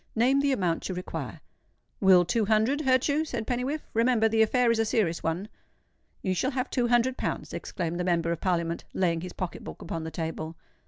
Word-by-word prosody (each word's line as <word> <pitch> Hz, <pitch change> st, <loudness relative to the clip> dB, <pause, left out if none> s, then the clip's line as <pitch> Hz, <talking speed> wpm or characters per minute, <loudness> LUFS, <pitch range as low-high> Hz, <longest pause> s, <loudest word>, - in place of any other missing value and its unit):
Name 255 Hz, +5 st, +4 dB
the 280 Hz, 0 st, +2 dB
amount 180 Hz, -10 st, 0 dB
you 185 Hz, -, -3 dB
require." 180 Hz, -, -6 dB, 0.6 s
"Will 185 Hz, -2 st, +6 dB
two 220 Hz, +5 st, +1 dB
hundred 220 Hz, +7 st, +2 dB
hurt 260 Hz, -3 st, +3 dB
you?" 295 Hz, +2 st, +2 dB
said 295 Hz, -7 st, -4 dB
Pennywhiffe. 255 Hz, +6 st, -2 dB
"Remember—the 225 Hz, -1 st, +3 dB
affair 240 Hz, +2 st, +3 dB
is 230 Hz, -, +1 dB
a -, -, +4 dB
serious 210 Hz, -7 st, 0 dB
one." 165 Hz, +5 st, -2 dB, 0.8 s
"You 185 Hz, -, +1 dB
shall 255 Hz, +8 st, 0 dB
have 260 Hz, -1 st, -3 dB
two 245 Hz, -2 st, +1 dB
hundred 240 Hz, +2 st, +2 dB
pounds," -, -, -3 dB
exclaimed 175 Hz, -2 st, -3 dB
the -, -, 0 dB
Member 170 Hz, -2 st, +1 dB
of 170 Hz, -, -3 dB
Parliament, 170 Hz, -2 st, 0 dB
laying 170 Hz, -3 st, +1 dB
his 180 Hz, 0 st, -7 dB
pocket 185 Hz, -2 st, -5 dB
book -, -, -8 dB
upon 165 Hz, -1 st, -4 dB
the 160 Hz, -, -4 dB
table. 160 Hz, 0 st, -4 dB
215 Hz, 200 wpm, -27 LUFS, 175-250 Hz, 0.8 s, Will